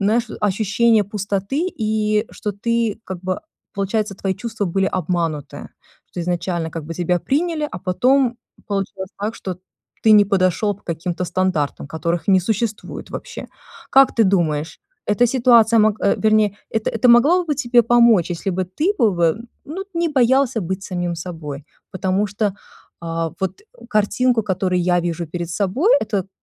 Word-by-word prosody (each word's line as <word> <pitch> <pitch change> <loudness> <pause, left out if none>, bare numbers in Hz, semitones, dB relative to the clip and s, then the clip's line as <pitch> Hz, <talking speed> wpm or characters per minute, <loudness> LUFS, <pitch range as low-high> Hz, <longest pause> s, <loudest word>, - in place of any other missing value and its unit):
знаешь, 220 +4 +1
ощущения 210 +2 +2
пустоты 205 - -2
и 215 -4 0
что 210 - -4
ты, 230 +1 -1
как 190 -1 -6
бы, 185 0 -3 0.3
получается, 200 +1 -1
твои 190 0 -2
чувства 225 0 -4
были 195 +2 0
обмануты, 165 -5 -3 0.4
что 180 - -5
изначально, 170 -1 -2
как 160 0 -6
бы, 165 - -6
тебя 175 +1 0
приняли, 305 - -1
а - - -6
потом 245 +8 +2 0.3
получилось 195 -1 -3
так, 215 +2 -2
что 185 -2 -6 0.4
ты 220 - +4
не 210 -1 +7
подошёл 195 +1 +1
по 205 - -23
каким-то 170 +2 -3
стандартам, 175 -6 -1
которых 165 +2 -3
не 190 -1 +5
существует 220 +3 -3
вообще. - - -7 0.4
Как 270 0 +6
ты 225 - +4
думаешь, 165 -5 0 0.3
эта 240 +4 +3
ситуация 235 -2 +4
мог 215 0 +2
э, 200 - +3
вернее, 215 -2 +2
это 220 -1 -1
это 230 +2 +1
могло 290 +10 +5
бы 305 -3 -1
тебе 245 -3 +3
помочь, 230 -6 +4
если 175 +3 -2
бы 185 +1 -1
ты 295 - -1
бы 225 -6 +4
вы, 170 -1 +2 0.3
ну, 365 +7 -6
не 335 0 +1
боялся 260 -3 +2
быть 190 +1 -4
самим 175 -3 -3
собой. 160 -5 -7 0.3
Потому 190 +2 0
что, 205 +2 -3 0.6
э, 165 -1 -2
вот, 190 - -3
э, 450 - -18
картинку, 225 +2 +2
которую 185 -2 0
я 175 0 +2
вижу 170 0 -3
перед 170 +2 -5
собой, 205 - +1
это 200 -3 -1
к - - -28
200 Hz, 165 wpm, -20 LUFS, 180-230 Hz, 0.6 s, не